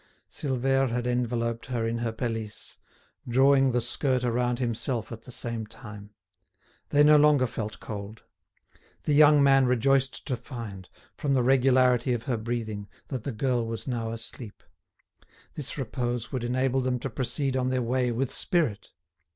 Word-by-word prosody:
Silvère 135 Hz, -1 st, 0 dB
had 120 Hz, +1 st, -2 dB
enveloped 120 Hz, -2 st, -1 dB
her 120 Hz, -3 st, -1 dB
in 115 Hz, +1 st, -1 dB
her 115 Hz, -1 st, -1 dB
pelisse, 110 Hz, -2 st, -5 dB, 0.5 s
drawing 135 Hz, +2 st, +4 dB
the 125 Hz, -, +1 dB
skirt 125 Hz, +2 st, 0 dB
around 120 Hz, 0 st, 0 dB
himself 120 Hz, -1 st, -2 dB
at 115 Hz, -1 st, -7 dB
the 125 Hz, -, -12 dB
same 115 Hz, -2 st, -4 dB
time. 105 Hz, -3 st, -11 dB, 0.8 s
They 145 Hz, 0 st, +5 dB
no 150 Hz, 0 st, +7 dB
longer 145 Hz, -3 st, +5 dB
felt 110 Hz, -3 st, -5 dB
cold. 105 Hz, +1 st, -7 dB, 0.8 s
The 150 Hz, -, +1 dB
young 145 Hz, -1 st, +7 dB
man 135 Hz, -2 st, +5 dB
rejoiced 135 Hz, +2 st, +1 dB
to 130 Hz, -, -1 dB
find, 115 Hz, -7 st, -8 dB, 0.3 s
from 140 Hz, -2 st, 0 dB
the 125 Hz, -, +3 dB
regularity 125 Hz, -1 st, +4 dB
of 120 Hz, -1 st, -3 dB
her 125 Hz, -4 st, -1 dB
breathing, 110 Hz, -3 st, -4 dB, 0.2 s
that 130 Hz, -5 st, -4 dB
the 140 Hz, -, -2 dB
girl 120 Hz, 0 st, 0 dB
was 115 Hz, -1 st, -5 dB
now 115 Hz, -3 st, -2 dB
asleep; 115 Hz, -1 st, -8 dB, 0.9 s
this 145 Hz, -1 st, -4 dB
repose 120 Hz, -2 st, -3 dB
would 130 Hz, -3 st, -3 dB
enable 130 Hz, +2 st, +1 dB
them 125 Hz, 0 st, 0 dB
to 130 Hz, +2 st, -4 dB
proceed 130 Hz, +3 st, -2 dB
on 130 Hz, -1 st, +1 dB
their 130 Hz, -1 st, 0 dB
way 125 Hz, +1 st, 0 dB
with 130 Hz, +3 st, -2 dB
spirit. 140 Hz, -, 0 dB
125 Hz, 160 wpm, -27 LUFS, 115-135 Hz, 0.9 s, no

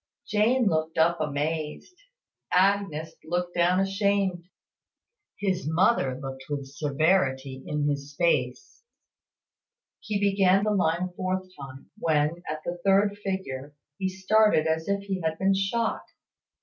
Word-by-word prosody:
Jane 230 Hz, +4 st, +2 dB
looked 160 Hz, -3 st, 0 dB
up 165 Hz, +1 st, +3 dB
amazed 155 Hz, -, -3 dB, 0.6 s
Agnes 185 Hz, -4 st, +1 dB
looked 175 Hz, +2 st, -2 dB
down 175 Hz, +1 st, +3 dB
ashamed; 195 Hz, -2 st, 0 dB, 0.9 s
his 190 Hz, -5 st, -1 dB
mother 160 Hz, -, +2 dB
looked 135 Hz, -1 st, -7 dB
with 145 Hz, -2 st, -3 dB
severity 140 Hz, -2 st, 0 dB
in 150 Hz, -1 st, -1 dB
his 145 Hz, 0 st, -3 dB
face. 125 Hz, -, 0 dB, 1.2 s
He 210 Hz, -2 st, -3 dB
began 195 Hz, -1 st, +3 dB
the 215 Hz, -, +1 dB
line 175 Hz, -3 st, +1 dB
a 185 Hz, -, -4 dB
fourth 185 Hz, +1 st, -2 dB
time, 135 Hz, -1 st, -11 dB
when, 155 Hz, +1 st, +1 dB
at 155 Hz, 0 st, -4 dB
the 175 Hz, 0 st, -4 dB
third 200 Hz, +1 st, +3 dB
figure, 145 Hz, -8 st, -4 dB, 0.2 s
he 190 Hz, -1 st, 0 dB
started 190 Hz, -2 st, +3 dB
as 160 Hz, 0 st, -1 dB
if 200 Hz, 0 st, 0 dB
he 195 Hz, -2 st, -3 dB
had 160 Hz, -1 st, -1 dB
been 195 Hz, +2 st, +2 dB
shot. 195 Hz, +4 st, -1 dB
175 Hz, 130 wpm, -26 LUFS, 150-195 Hz, 1.2 s, up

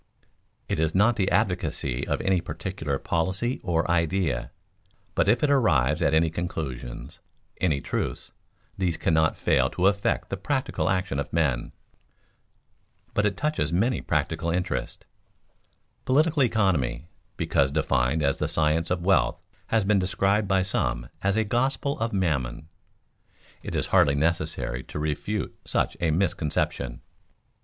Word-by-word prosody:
_ -, -, -42 dB, 0.4 s
It -, -, -1 dB
is 80 Hz, +1 st, 0 dB
not 105 Hz, +5 st, +4 dB
the 100 Hz, -4 st, +1 dB
advocacy 65 Hz, 0 st, -1 dB
of -, -, -1 dB
any 95 Hz, -2 st, +2 dB
particular 80 Hz, -3 st, -4 dB
policy 95 Hz, -, -1 dB
or 85 Hz, -2 st, +1 dB
idea, 85 Hz, -8 st, 0 dB, 0.6 s
but -, -, +2 dB
if 115 Hz, +5 st, +3 dB
it 145 Hz, -, +3 dB
arrives 75 Hz, -, +3 dB
at -, -, +3 dB
any 80 Hz, 0 st, +3 dB
conclusions, 75 Hz, -8 st, -5 dB, 0.4 s
any 75 Hz, -7 st, +1 dB
truths, -, -, -3 dB, 0.4 s
these 90 Hz, -3 st, -1 dB
cannot 80 Hz, 0 st, +2 dB
fail -, -, +2 dB
to 90 Hz, -, -1 dB
affect 100 Hz, 0 st, +1 dB
the -, -, -2 dB
practical 135 Hz, -1 st, -1 dB
action 90 Hz, -7 st, 0 dB
of 70 Hz, -, -4 dB
men. 80 Hz, -6 st, +2 dB
[Sidenote: -, -, -11 dB, 1.4 s
But 105 Hz, -, +1 dB
it 100 Hz, -, -3 dB
touches 150 Hz, -, 0 dB
many 110 Hz, +9 st, +1 dB
practical 80 Hz, +1 st, -1 dB
interests] 90 Hz, +2 st, -2 dB, 1.0 s
Political 150 Hz, +1 st, +3 dB
economy, 80 Hz, -, 0 dB, 0.3 s
because 70 Hz, -, +2 dB
defined 70 Hz, 0 st, +1 dB
as 70 Hz, -1 st, +1 dB
the -, -, 0 dB
science 80 Hz, +1 st, +2 dB
of 90 Hz, -1 st, -1 dB
wealth, 95 Hz, -2 st, +3 dB, 0.3 s
has 110 Hz, -3 st, +1 dB
been 100 Hz, 0 st, +3 dB
described 100 Hz, +2 st, +1 dB
by 95 Hz, -1 st, +2 dB
some -, -, -1 dB
as 100 Hz, +2 st, +1 dB
a 110 Hz, -, +3 dB
gospel 130 Hz, +5 st, 0 dB
of 115 Hz, +1 st, -1 dB
Mammon. 75 Hz, -6 st, -1 dB, 0.9 s
It -, -, -6 dB
is -, -, 0 dB
hardly 70 Hz, -, +5 dB
necessary 80 Hz, -5 st, -1 dB
to -, -, -7 dB
refute 75 Hz, -1 st, -2 dB
such -, -, 0 dB
a 85 Hz, -, +2 dB
misconception. 80 Hz, -2 st, -1 dB
85 Hz, 145 wpm, -26 LUFS, 75-100 Hz, 1.4 s, hardly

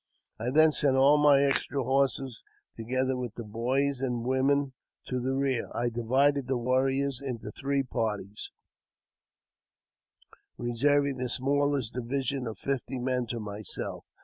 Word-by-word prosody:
I 115 Hz, +2 st, -2 dB
then 155 Hz, +4 st, +5 dB
sent 140 Hz, -3 st, +3 dB
all 140 Hz, +3 st, +6 dB
my 145 Hz, -2 st, +6 dB
extra 140 Hz, 0 st, 0 dB
horses, 135 Hz, -1 st, 0 dB, 0.3 s
together 130 Hz, +3 st, -1 dB
with 125 Hz, -3 st, -5 dB
the 120 Hz, -, -6 dB
boys 125 Hz, +5 st, -1 dB
and 125 Hz, -3 st, -1 dB
women, 135 Hz, +1 st, +1 dB, 0.3 s
to 125 Hz, -, -2 dB
the 130 Hz, +2 st, -1 dB
rear; 135 Hz, -2 st, 0 dB
I 120 Hz, 0 st, 0 dB
divided 130 Hz, +4 st, +1 dB
the 130 Hz, -1 st, 0 dB
warriors 130 Hz, +2 st, 0 dB
into 120 Hz, -6 st, -5 dB
three 140 Hz, +3 st, -1 dB
parties, 105 Hz, -5 st, -3 dB, 2.1 s
reserving 140 Hz, +3 st, +1 dB
the 125 Hz, 0 st, -2 dB
smallest 140 Hz, -1 st, +1 dB
division 130 Hz, +1 st, -2 dB
of 110 Hz, -, -6 dB
fifty 135 Hz, -1 st, -3 dB
men 125 Hz, -1 st, -1 dB
to 120 Hz, 0 st, -4 dB
myself. 105 Hz, -1 st, -5 dB
130 Hz, 135 wpm, -28 LUFS, 120-140 Hz, 2.1 s, all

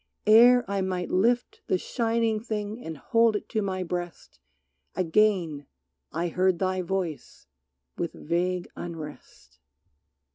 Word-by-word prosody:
Ere 240 Hz, +3 st, +7 dB
I 200 Hz, 0 st, -1 dB
might 185 Hz, -1 st, -2 dB
lift 235 Hz, +6 st, +1 dB
The -, -, +2 dB
shining 230 Hz, +1 st, 0 dB
thing 215 Hz, 0 st, -4 dB
and 160 Hz, -1 st, -6 dB
hold 230 Hz, +7 st, +3 dB
it 210 Hz, -, -4 dB
to 220 Hz, -, 0 dB
my 190 Hz, -2 st, -2 dB
breast 175 Hz, 0 st, -6 dB, 0.6 s
Again 175 Hz, -5 st, +1 dB, 0.4 s
I 170 Hz, +3 st, -1 dB
heard 185 Hz, +1 st, +2 dB
thy 185 Hz, 0 st, 0 dB
voice 180 Hz, -4 st, -4 dB, 0.5 s
with -, -, -2 dB
vague 175 Hz, +2 st, -1 dB
unrest. 155 Hz, -, -9 dB
185 Hz, 120 wpm, -27 LUFS, 175-215 Hz, 0.6 s, Ere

